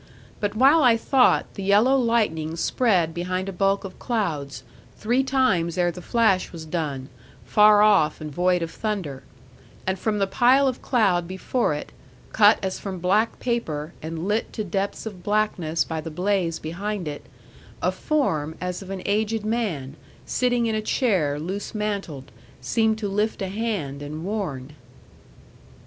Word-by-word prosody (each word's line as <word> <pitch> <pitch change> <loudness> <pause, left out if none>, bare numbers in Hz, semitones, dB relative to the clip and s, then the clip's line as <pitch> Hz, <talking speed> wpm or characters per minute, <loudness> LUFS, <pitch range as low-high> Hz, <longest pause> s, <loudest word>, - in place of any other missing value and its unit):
But 205 0 -2
while 275 +7 +5
I 240 -4 +5
thought, 255 +2 +3
the 200 - -7
yellow 205 +7 +4
lightning 215 -11 +1
spread 175 -3 +1
behind 185 +2 -3
a - - -3
bulk 195 +2 +1
of 195 - -9
clouds, 150 - -2 0.3
three 245 +5 +1
times 190 -11 +1
ere 175 -1 +2
the 180 - -9
flash 220 -4 +2
was 165 -2 -8
done, 150 -5 -3 0.4
far 210 0 +6
off 195 -8 +4
and 155 -1 -6
void 180 +1 +2
of 165 - -5
thunder; 180 -11 -4 0.6
and 190 0 -1
from 215 +1 0
the 200 - +2
pile 255 +7 +4
of 255 -1 -2
cloud 190 -9 +2
before 190 - -1
it, 150 - -7 0.4
cut 210 0 +6
as 190 - -3
from 195 -2 -5
black 195 +6 +1
paper, 170 -11 -2
and 160 +3 -5
lit 210 +2 0
to 215 - -3
depths 195 +3 -3
of 200 -5 -7
blackness 185 -6 0
by 160 -1 -4
the 165 - -6
blaze 180 0 0
behind 190 +3 -4
it, 145 -1 -7 0.5
a - - +1
form 160 - -1
as 180 +1 -4
of 190 - -10
an 195 -1 -5
aged 215 +1 0
man, 190 - -2 0.3
sitting 245 -1 +1
in 225 - 0
a 215 - 0
chair 185 - +1
loose 190 +7 -5
mantled, 195 -10 -4 0.3
seemed 220 - +1
to 215 -2 -3
lift 210 +2 -1
a 195 -2 -3
hand 195 -10 -3
and 155 +3 -6
warn. 160 -11 -4
195 Hz, 160 wpm, -24 LUFS, 165-220 Hz, 0.6 s, far